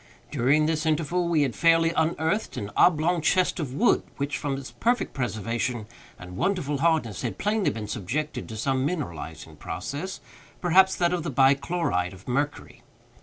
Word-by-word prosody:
During 145 +3 +3
this 160 0 0
interval 165 +3 +1
we 160 -3 +3
had 130 -4 -1
fairly 165 0 +4
unearthed 160 +6 0
an 100 0 -4
oblong 170 +1 +3
chest 185 +3 +2
of 135 -5 -4
wood, 235 +9 +3 0.2
which, 140 +1 -2
from 140 -2 -2
its 135 -1 -8
perfect 240 +2 0
preservation 115 -1 -2 0.3
and 90 0 -10
wonderful 150 - 0
hardness, 155 - +1
had 115 -7 -3
plainly 210 -1 +1
been 105 -1 -5
subjected 125 +11 -3
to 110 - -6
some 130 +3 0
mineralizing 85 - -5
process—perhaps 190 +3 -1
that 175 0 +1
of 180 - 0
the 160 - -3
bi 135 0 +5
chloride 135 - -1
of 95 +1 -15
mercury. 145 +4 -2
150 Hz, 160 wpm, -26 LUFS, 120-170 Hz, 0.3 s, bi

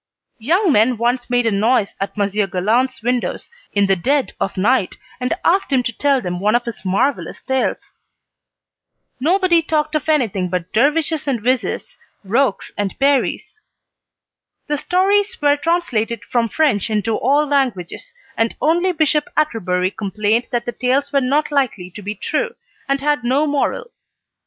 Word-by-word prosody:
Young 340 - +2
men 235 0 +3
once 245 +2 0
made 245 -1 +2
a 225 - +2
noise 210 +1 +1
at 195 - -4
Monsieur 205 0 0
Galland's 225 +7 0
windows 245 - -2 0.2
in 200 -1 +2
the 195 0 +3
dead 270 +9 0
of 195 - -2
night, 210 +1 +1 0.2
and 250 +6 -1
asked 380 -1 +2
him 260 -2 +3
to 235 - -3
tell 280 -2 +2
them 180 -3 -4
one 210 +4 +2
of 240 - +1
his 235 -4 -6
marvellous 200 +9 -1
tales. 265 -1 -2 1.2
Nobody 345 +3 +3
talked 310 -1 -1
of 305 0 -1
anything 215 -12 +1
but 180 -1 -4
dervishes 300 +5 +1
and 260 -4 0
vizirs, 250 +2 -1 0.2
rocs 225 +2 0
and 200 -2 -2
peris. 280 +9 0 1.1
The 295 - -1
stories 390 +5 +1
were 290 -1 +3
translated 250 - -1
from 235 +1 0
French 235 -7 +1
into 215 0 0
all 285 +4 +2
languages, 275 - -2 0.2
and 225 0 0
only 345 +4 +2
Bishop 305 -2 +2
Atterbury 185 - 0
complained 210 +3 -1
that 240 -1 -2
the 240 - -2
tales 260 +5 0
were 275 - +3
not 290 +4 +1
likely 245 -11 -1
to 210 - -10
be 205 +2 -5
true, - - -2 0.3
and 275 0 +1
had 295 -2 0
no 265 +5 +2
moral. 300 - -1
255 Hz, 155 wpm, -19 LUFS, 215-295 Hz, 1.2 s, men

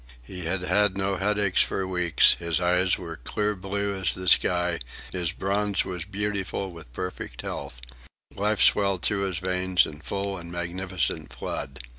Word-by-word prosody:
He 90 +6 -7
had 90 +2 -1
had 105 0 +2
no 95 0 0
headaches 100 0 +2
for 95 - 0
weeks, 90 -2 +4
his 85 -1 +1
eyes 90 +1 +3
were 85 -3 -7
clear 105 - -2
blue 100 +1 -2
as 95 -3 +3
the 90 0 -6
sky, 90 -1 +4 0.3
his 90 -3 0
bronze 100 +2 0
was 90 -2 -5
beautiful 100 -1 -3
with 80 -8 -12
perfect 90 +9 -6
health; - - -6 0.5
life 105 +2 +1
swelled 100 -3 +3
through 100 -1 +2
his 95 -3 -1
veins 90 0 +2
in 75 0 -9
full 100 +3 -3
and 85 0 -9
magnificent 85 0 -2
flood. 65 -1 -5
95 Hz, 160 wpm, -26 LUFS, 85-100 Hz, 0.5 s, weeks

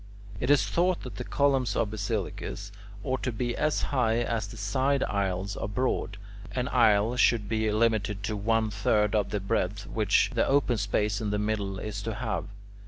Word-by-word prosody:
It 125 - -2
is 145 -2 +5
thought 180 +1 +1
that 125 - -8
the 125 - -4
columns 135 -2 +1
of 105 - 0
basilicas 105 -1 -4 0.3
ought 130 0 -1
to 125 - -1
be 120 +2 -2
as 155 0 0
high 120 -3 +2
as 115 -2 -2
the 115 - -10
side 130 +6 +1
aisles 100 0 -1
are - - -3
broad; 105 -3 -1 0.4
an 125 0 -1
aisle 115 -2 +4
should 115 -4 +3
be 110 0 0
limited 105 -2 +1
to 105 +2 -2
one 110 +1 +1
third 105 0 +1
of 105 -3 +1
the 105 - -1
breadth 100 0 -1
which 105 0 +2
the 115 - +2
open 135 -4 +2
space 105 +1 0
in 105 - -1
the 105 - 0
middle 105 -2 -1
is 105 +1 -5
to 110 +1 -4
have. 110 0 -2
110 Hz, 185 wpm, -28 LUFS, 105-125 Hz, 0.4 s, is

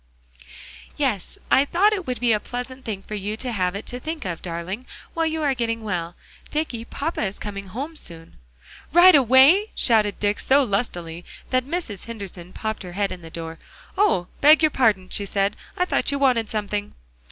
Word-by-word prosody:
"Yes, 250 -10 -1
I 270 - +6
thought 380 +8 +3
it 380 -5 -3
would 250 -1 -2
be 245 -1 +2
a 215 - +3
pleasant 250 +3 -6
thing 200 -3 -4
for - - -9
you 210 +1 -3
to 250 +1 -3
have 185 -4 0
it 200 - -5
to 245 - -6
think 310 -1 -5
of, 175 -3 -4
darling, 180 +7 -5 0.3
while 330 -1 +1
you 320 0 -2
are 280 -2 +2
getting 230 -2 -2
well. 175 -5 -3 0.3
Dicky, 280 -7 -2
papa 310 +7 -3
is 195 -2 -2
coming 200 -2 -6
home 275 - -5
soon." 165 - -9 0.5
"Right 350 +3 +8
away?" 275 - +6
shouted 215 -4 +3
Dick 205 0 0
so 275 +2 +4
lustily 175 -7 -3 0.3
that 255 -1 +2
Mrs. 285 - -4
Henderson 195 -6 -8
popped 220 +2 -4
her 180 -3 -8
head 200 +1 -1
in 185 -1 -7
the 165 - -10
door. 165 0 -7 0.4
"Oh! 390 - +3 0.2
beg 305 +2 +7
your 310 - +5
pardon," 215 -9 +2
she 200 - -3
said; 195 +1 0 0.2
"I 360 - +2
thought - - 0
you 280 - 0
wanted 250 -6 +2
something." 205 -1 -3
225 Hz, 190 wpm, -23 LUFS, 195-280 Hz, 0.5 s, Right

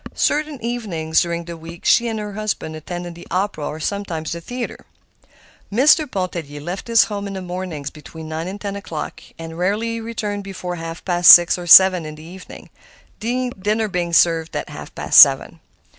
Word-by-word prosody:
Certain 300 -2 -1
evenings 195 -10 -1
during 170 -1 -3
the 170 0 -7
week 165 +1 -12
she 235 - +4
and 225 -1 -3
her 210 -1 -6
husband 205 -6 -4
attended 175 +2 -7
the 170 - -13
opera 185 -4 -2
or 155 - -6
sometimes 170 -3 -4
the 170 - -5
play. 245 +6 -6 1.0
Mr. 295 +6 +4
Pontellier 170 - -5
left 175 +9 -6
his 230 -1 +5
home 205 -1 -5
in 200 - -6
the 190 - -5
mornings 180 -5 -6
between 155 +1 -11
nine 160 +2 -5
and 195 +2 -7
ten 200 -1 -5
o'clock, 170 -6 -7 0.2
and 165 0 -9
rarely 225 +5 -1
returned 210 -3 -4
before 180 -2 -6
half 165 0 -8
past 175 -1 +4
six 175 -1 +9
or 175 -1 -8
seven 185 0 +8
in 155 0 -8
the 155 - -13
evening—dinner 215 +4 -5
being 180 -3 -3
served 165 -1 +2
at - - -4
half - - -10
past - - +4
seven. - - +6
180 Hz, 175 wpm, -20 LUFS, 165-210 Hz, 1.0 s, six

